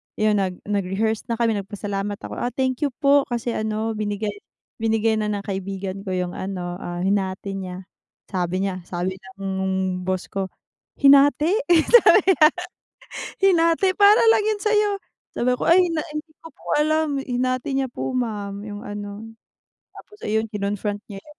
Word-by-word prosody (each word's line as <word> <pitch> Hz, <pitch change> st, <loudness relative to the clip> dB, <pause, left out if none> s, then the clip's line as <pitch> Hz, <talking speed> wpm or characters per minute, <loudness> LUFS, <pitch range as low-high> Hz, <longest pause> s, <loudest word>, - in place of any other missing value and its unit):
yung 215 Hz, -1 st, +2 dB
nag 185 Hz, -2 st, -2 dB
nag-rehearse 205 Hz, +2 st, -1 dB
na 235 Hz, -, -1 dB
kami 225 Hz, -2 st, +1 dB
nag 200 Hz, -, -4 dB
pasalamat 205 Hz, -1 st, -3 dB
ako, -, -, -7 dB
ah, 245 Hz, -, -2 dB
"Thank 260 Hz, +2 st, 0 dB
you 275 Hz, -, -2 dB
po 280 Hz, 0 st, +5 dB
kasi 240 Hz, -1 st, -3 dB
ano 220 Hz, 0 st, -2 dB
binigay, 210 Hz, 0 st, -2 dB, 0.5 s
binigay 225 Hz, 0 st, +1 dB
na 215 Hz, -, -1 dB
ng 200 Hz, -, -3 dB
kaibigan 195 Hz, 0 st, -5 dB
ko 190 Hz, -, -3 dB
yung 180 Hz, -1 st, -2 dB
ano, 180 Hz, -2 st, -4 dB
ah, 175 Hz, -2 st, -5 dB
hinati 195 Hz, 0 st, -1 dB
niya," 185 Hz, -1 st, -6 dB, 0.5 s
sabi 185 Hz, 0 st, -1 dB
niya, 185 Hz, -2 st, -5 dB
sabi 185 Hz, +2 st, -3 dB, 0.2 s
ng 190 Hz, -1 st, -1 dB
boss 185 Hz, -1 st, -2 dB
ko, 195 Hz, -1 st, -2 dB, 0.6 s
"Hinati?" 285 Hz, +6 st, +6 dB, 0.3 s
Sabi 475 Hz, -3 st, +7 dB
niya, 315 Hz, -5 st, +7 dB, 0.9 s
"Hinati? 345 Hz, -1 st, +4 dB
Para 415 Hz, +2 st, +7 dB
lang 445 Hz, -1 st, +4 dB
yan 430 Hz, -1 st, 0 dB
sayo," 425 Hz, 0 st, +3 dB, 0.4 s
sabi 250 Hz, +1 st, +1 dB
ko, -, -, -3 dB
"Ay 350 Hz, +2 st, +6 dB
na 320 Hz, -2 st, -2 dB
hindi 305 Hz, +2 st, -5 dB
ko -, -, -12 dB
po -, -, -23 dB
alam 310 Hz, -1 st, +1 dB
hinati 255 Hz, 0 st, -1 dB
niya 270 Hz, -1 st, 0 dB
po 255 Hz, -, -4 dB
ma'am 205 Hz, -5 st, -3 dB
yung 205 Hz, +2 st, -8 dB
ano," 205 Hz, +1 st, -7 dB, 0.7 s
tapos 420 Hz, -, -14 dB
ayun 220 Hz, +1 st, 0 dB
kinon-front 205 Hz, 0 st, -2 dB
niya 195 Hz, -2 st, -9 dB
yun. 300 Hz, 0 st, -18 dB
215 Hz, 165 wpm, -23 LUFS, 195-275 Hz, 0.9 s, Sabi